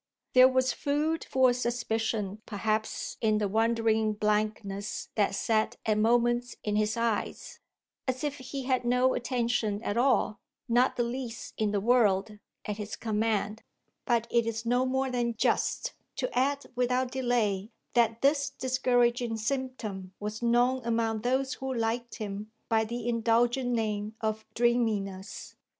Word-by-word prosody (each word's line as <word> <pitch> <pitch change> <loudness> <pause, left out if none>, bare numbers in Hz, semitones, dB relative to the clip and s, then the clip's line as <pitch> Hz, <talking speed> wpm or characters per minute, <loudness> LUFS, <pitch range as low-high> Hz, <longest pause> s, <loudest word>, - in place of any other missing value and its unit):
There 255 0 +9
was 260 -1 +2
food 300 +3 0
for 260 -1 +4
suspicion 225 -4 -2
perhaps 215 +1 -2
in 215 -1 +3
the 210 -1 +1
wandering 220 0 +2
blankness 210 -1 -1
that 205 -2 +1
sat 220 +1 +1
at 215 - +2
moments 240 +2 +2
in 210 -1 -1
his 215 +1 +1
eyes, 230 -2 -2 0.5
as 260 +2 -2
if 290 -1 -2
he 265 +1 -5
had 255 -1 +1
no 250 +2 +3
attention 235 -4 0
at 205 - -2
all, 240 -3 +2 0.3
not 245 +2 +3
the 240 - +1
least 240 -1 -5
in 215 -1 0
the 205 0 0
world, 210 -2 +2 0.3
at 210 -1 -3
his 210 0 -5
command; 220 -1 -1 0.4
but 235 -3 +1
it 235 -1 +2
is 225 0 -3
no 245 +2 +2
more 265 0 0
than 240 -2 0
just - - 0 0.2
to 255 -2 -3
add 280 +3 +1
without 250 +1 +1
delay 235 -6 0 0.2
that 230 0 +2
this 280 0 +3
discouraging 245 -3 +1
symptom 220 -6 -4
was 210 +2 -5
known 245 +2 +3
among 225 -2 0
those 265 +3 0
who 265 0 -4
liked 235 0 -2
him 210 -1 -5 0.2
by 220 -1 +3
the 235 +1 -4
indulgent 240 +2 +2
name 215 -2 -1
of 220 0 -2
dreaminess. 220 -5 -1
235 Hz, 145 wpm, -29 LUFS, 215-250 Hz, 0.5 s, There